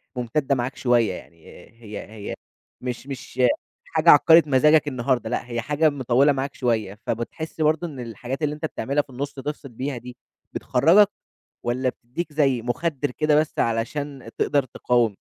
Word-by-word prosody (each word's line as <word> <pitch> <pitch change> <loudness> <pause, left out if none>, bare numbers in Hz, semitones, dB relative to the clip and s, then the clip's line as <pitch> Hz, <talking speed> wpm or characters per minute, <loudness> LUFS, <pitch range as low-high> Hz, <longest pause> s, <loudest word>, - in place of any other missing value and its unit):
مُمتدة 130 +3 0
معاك 125 +1 -3
شوية 120 -6 +2
يعني، 85 -2 -12 0.4
هي 105 -2 -7
هي 105 -2 -6 0.5
مش 125 +1 -5
مش 130 -2 -5 0.5
حاجة 160 +1 +2
عكرِت 160 +1 +7
مزاجك 150 +3 +4
النهارده 125 -3 0
لأ، 120 - -2
هي 120 -1 -2
حاجة 150 +6 +2
مطولة 135 0 +3
معاك 135 0 -3
شوية، 110 -5 -1
فبتحس 155 +8 -4
برضه 155 +2 +2
إن 145 -5 -9
الحاجات 120 +4 -5
اللي 150 0 0
أنت 150 +1 -4
بتعملها 140 -1 -1
في 145 - -22
النُص 140 +3 -5
تفصل 145 +1 -6
بيها 130 +3 -4
دي 125 +1 -10 0.4
بتخرّجك؟ 170 +11 +4 0.6
والَّا 125 +2 0
بتديك 130 +7 -5
زي 135 -5 +2
مُخدر 145 +4 -1
كده 155 +3 +1
بس 155 - -4
علشان 125 +3 -2
تقدر 140 -2 +2
تقاوم؟ 120 -3 +1
130 Hz, 155 wpm, -24 LUFS, 120-150 Hz, 0.6 s, عكرِت